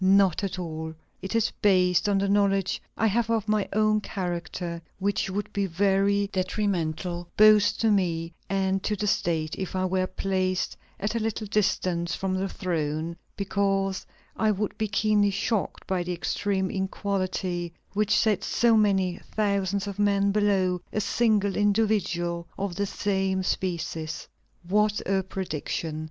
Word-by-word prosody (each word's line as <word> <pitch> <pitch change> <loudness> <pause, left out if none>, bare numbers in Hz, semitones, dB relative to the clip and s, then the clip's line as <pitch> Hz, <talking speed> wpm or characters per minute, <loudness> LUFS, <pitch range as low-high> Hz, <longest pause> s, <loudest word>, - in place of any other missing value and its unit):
Not 195 -1 +4
at 190 -1 -2
all. 160 -2 -5 0.3
It 190 +4 -4
is 230 - +2
based 185 0 +4
on 200 - +3
the 200 +1 +1
knowledge 195 -1 +2 0.2
I 225 - +2
have 225 +1 +1
of 225 -2 0
my 210 -1 +1
own 215 0 +2
character, 175 -3 -4 0.2
which 200 0 0
would 205 +2 -4
be 200 -1 0
very 200 +3 +2
detrimental 180 -3 -1
both 215 -1 +6
to 225 -1 +2
me 170 -4 0 0.2
and 195 0 +1
to 210 - -1
the 210 - -2
State 165 -5 0
if 190 -1 -4
I 185 0 +1
were 185 0 +1
placed 185 -1 -1 0.2
at 210 +2 -1
a 230 - 0
little 220 0 -2
distance 180 -4 0
from 190 -1 -2
the 190 +1 -1
throne; 165 -3 -2 0.2
because 195 -1 0 0.3
I 220 - +2
would 210 0 -1
be 215 - -1
keenly 210 -1 +3
shocked 200 +1 -2
by 190 -2 0
the 175 +1 -2
extreme 190 +2 -1
inequality 190 -3 -2 0.2
which 215 +1 +2
sets 215 -4 +2
so 235 -1 +3
many 190 -4 +2 0.2
thousands 200 -2 +1
of 200 0 -6
men 200 -1 +3
below 195 -3 +2
a - - -1
single 205 -1 +2
individual 200 -5 +1
of 195 -3 -3
the 200 +2 -1
same 190 -1 0
species!" 165 -4 -3 0.4
What 210 +2 +2
a 195 0 +2
prediction! 165 -4 -4
195 Hz, 150 wpm, -26 LUFS, 180-205 Hz, 0.4 s, both